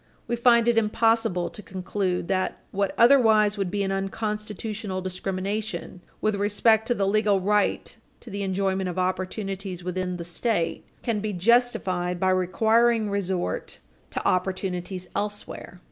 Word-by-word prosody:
We 240 - 0
find 235 -1 +4
it 235 -1 +5
impossible 215 -5 +1
to - - -10
conclude 185 -2 -2
that 185 -1 0
what 200 0 -1
otherwise 225 -5 +5
would 195 -3 -2
be 200 +2 -1
an 195 - -1
unconstitutional 210 0 -3
discrimination, 185 0 -4 0.2
with 215 - +2
respect 215 +2 +2
to 245 - +2
the 200 - 0
legal 205 0 +3
right 205 +2 0 0.3
to 230 - -11
the 200 +1 -4
enjoyment 190 -1 0
of 180 - -6
opportunities 185 0 -3
within 180 0 -2
the 170 - -6
State, 175 +1 -1 0.2
can 230 -4 0
be 210 0 -3
justified 185 -4 +1
by 185 +1 +3
requiring 220 +4 +2
resort 190 -3 -2 0.3
to - - -2
opportunities 185 0 -1
elsewhere. 205 -3 -5
195 Hz, 140 wpm, -25 LUFS, 185-215 Hz, 0.3 s, it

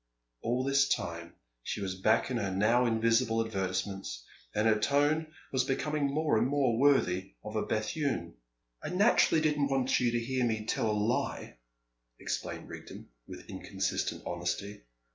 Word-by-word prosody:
All 125 +2 0
this 140 0 +3
time 85 0 -3 0.3
she - - -4
was 95 -2 -2
back 110 +5 +3
in 125 - 0
her 100 -4 -1
now 110 +6 +3
invisible 115 0 +2
advertisements. 95 - -3 0.3
And 105 +1 +2
her 110 -1 +4
tone 145 +6 +2 0.2
was 130 - +2
becoming 145 +2 0
more 150 -5 +2
and 120 - +2
more 130 -5 +1
worthy 95 - +2
of 105 - -7
a 110 - +1
Bethune. 130 +7 -1 0.5
"I - - -3
naturally 180 -4 +4
didn't 150 -2 +2
want 135 -1 +2
you 125 - +2
to 120 0 0
hear 130 +2 -1
me 110 -2 0
tell 115 - 0
a - - +2
lie," 105 - -1 0.6
explained - - -4
Rigden, - - -10 0.2
with - - -10
inconsistent - - -3
honesty. 90 +4 -3
115 Hz, 155 wpm, -31 LUFS, 105-140 Hz, 0.6 s, her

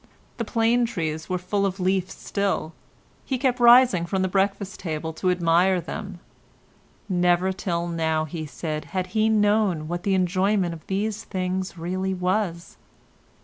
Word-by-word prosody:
The 230 - -2
plane 230 +2 +2
trees 160 -7 -4
were 185 - 0
full 195 +3 -1
of 195 0 -1
leaf 185 0 +1
still; 195 -5 -2 0.5
he 265 - -2
kept 255 -1 0
rising 240 -7 +6
from 190 +1 0
the - - +2
breakfast 195 +1 -1
table 160 -2 -4
to 185 +3 -1
admire 180 +1 +3
them; 180 +3 -7 0.9
never 180 0 +2
till 170 -2 -2
now, 160 -2 0
he 155 0 -6
said, 155 +1 -4
had 185 0 0
he 220 0 +3
known 205 -6 +2
what 175 +1 -3
the 195 0 +1
enjoyment 185 0 +1
of 160 - -12
these 205 +2 -2
things 185 -1 -3
really 185 +3 -2
was. 180 -1 -2
185 Hz, 150 wpm, -24 LUFS, 170-200 Hz, 0.9 s, rising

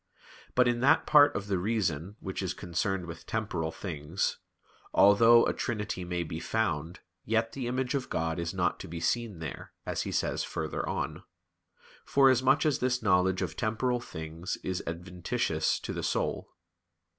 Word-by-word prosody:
But 125 0 +5
in 120 -1 +1
that 135 +3 +4
part 145 -1 +6
of 100 - -2
the 100 -3 0
reason 95 -3 -1
which 95 0 -4
is 90 -1 -2
concerned 90 +2 -2
with 85 -1 -9
temporal 90 -8 -2
things, 80 0 -3 0.6
"although 115 +4 +7
a - - +1
trinity 105 -5 -3
may 90 0 -2
be 80 0 -5
found; 85 -5 -2 0.2
yet 115 +1 +1
the 125 0 -4
image 125 0 -1
of 135 -2 -2
God 80 +1 -1
is 85 -1 -2
not 90 -2 0
to - - -7
be 85 0 -6
seen 105 +4 -1
there," 80 -2 -7
as - - -2
he - - -3
says - - 0
farther - - -3
on; - - -3 0.8
forasmuch 135 +2 +4
as 150 -4 +2
this 125 -1 0
knowledge 95 -1 +3
of 80 -3 -4
temporal 120 +3 0
things 80 -3 -6
is 95 -1 -2
adventitious 90 +2 -1
to - - -4
the - - -3
soul. - - -1
95 Hz, 165 wpm, -29 LUFS, 85-120 Hz, 0.8 s, although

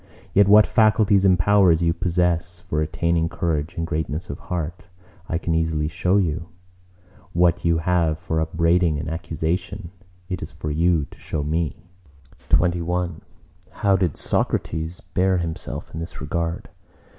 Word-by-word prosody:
Yet 100 0 +5
what 105 +1 +7
faculties 110 -3 +3
and 95 -2 +5
powers 90 -3 +4
you 85 0 +2
possess 90 0 0
for 75 -3 -2
attaining 80 +1 0
courage 80 -3 -2
and 85 -1 -2
greatness 80 0 -3
of 70 - -7
heart, 85 0 -5 0.4
I 80 - 0
can 85 0 -2
easily 80 -2 0
show 90 +4 +1
you; 85 -3 -1 0.9
what 85 0 +2
you 85 -1 +3
have 85 -2 +1
for 80 0 -2
upbraiding 85 0 +2
and 75 - -4
accusation, 85 +3 -3 0.4
it 90 -3 -4
is - - -6
for 75 - -5
you 80 0 +2
to - - -15
show 75 - -3
me! 80 +2 -2 0.6
XXI 85 -1 +1 0.5
How 100 -1 +2
did 90 -5 0
Socrates 80 +2 -1
bear 90 +1 +1
himself 85 -2 -4
in 80 - -5
this 80 - -7
regard? 85 +3 -3
85 Hz, 145 wpm, -23 LUFS, 80-90 Hz, 0.9 s, what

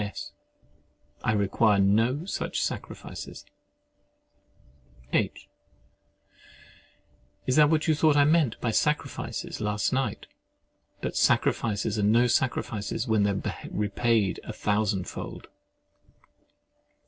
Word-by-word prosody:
S. 105 0 -5 0.9
I 110 - +2
require 105 +1 +3
no 115 - +2
such 195 - -3
sacrifices. - - -5 1.7
H. - - 0 2.0
Is 130 - +1
that 150 -1 +6
what 155 0 +1
you 160 - +4
thought 155 -1 +3
I 145 - +6
meant 150 -6 +2
by 115 - -1
SACRIFICES 150 -1 -2
last 105 +1 0
night? 130 -6 -1 0.8
But - - -3
sacrifices 105 -1 +1
are - - +1
no 115 +4 +4
sacrifices 115 -2 -1
when 110 -2 +2
they 100 - +3
are 100 -1 -2 0.2
repaid 105 -1 0
a - - -6
thousand 105 -2 0
fold. - - -7
110 Hz, 105 wpm, -27 LUFS, 105-130 Hz, 2.0 s, that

